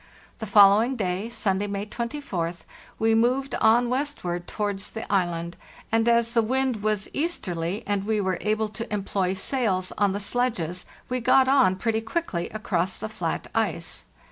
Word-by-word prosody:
The 220 - -5
following 205 +5 +6
day 195 0 -2
(Sunday, 205 -3 -1
May 200 0 -3
24th) 210 - -4 0.4
we 225 0 +3
moved 250 +4 +2
on 235 +2 +5
westward 240 -10 -2
towards 205 -2 -3
the 225 - -6
island, 170 -2 0 0.3
and 225 +1 +2
as 235 0 +3
the 230 - +4
wind 255 -1 0
was 210 -2 0
easterly 190 - -2
and 205 -1 0
we 215 +1 0
were 190 -3 -1
able 215 0 0
to 225 +2 -7
employ 195 -2 0
sails 190 -3 -1
on 205 -2 +3
the 200 - -2
sledges 200 -6 -2 0.2
we 255 0 -1
got 260 +2 +4
on 260 -9 +4
pretty 220 +3 0
quickly 225 - -2
across 190 -4 -1
the 220 - -5
flat 220 - -3
ice. - - -2
215 Hz, 160 wpm, -25 LUFS, 190-235 Hz, 0.4 s, following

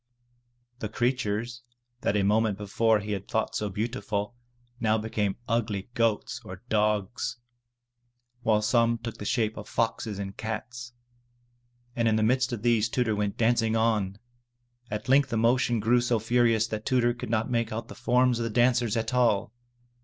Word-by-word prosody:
The 110 - -4
creatures 120 0 -1 0.4
that 105 - 0
a 100 - +2
moment 105 0 +2
before 110 +1 +1
he 105 +1 -5
had 100 -1 -4
thought 110 - -1
so 105 - -1
beautiful, 105 0 -3 0.5
now 110 -1 +2
became 105 -2 -1
ugly 110 -3 -1
goats 115 -3 0
or 95 0 -10
dogs, 105 +1 0 1.0
while 110 -2 +2
some 115 +1 +3
took 115 0 -7
the 105 - -6
shape 110 -1 0
of 105 - -8
foxes 115 -2 -1
and 100 0 -5
cats. 120 +2 -6 1.0
And 115 -1 +1
in 110 - +3
the 110 - +2
midst 130 +3 +2
of 115 -3 -4
these 115 -2 +3
Tudur 115 -3 0
went 105 -1 -2
dancing 115 -1 +2
on! 110 -4 +1 0.7
At 105 0 -4
length 135 +2 +4
the 115 - -1
motion 120 +1 +2
grew 120 +3 +3
so 120 -1 +1
furious 115 0 +2
that 110 -1 -5
Tudur 120 -2 +2
could 120 - -7
not 115 +2 0
make 115 -2 0
out 110 +1 -4
the - - -9
forms 125 +3 +2
of - - -1
the 115 - -2
dancers 120 0 +2
at 115 +1 -2
all. 115 -4 +2
110 Hz, 170 wpm, -27 LUFS, 105-120 Hz, 1.0 s, length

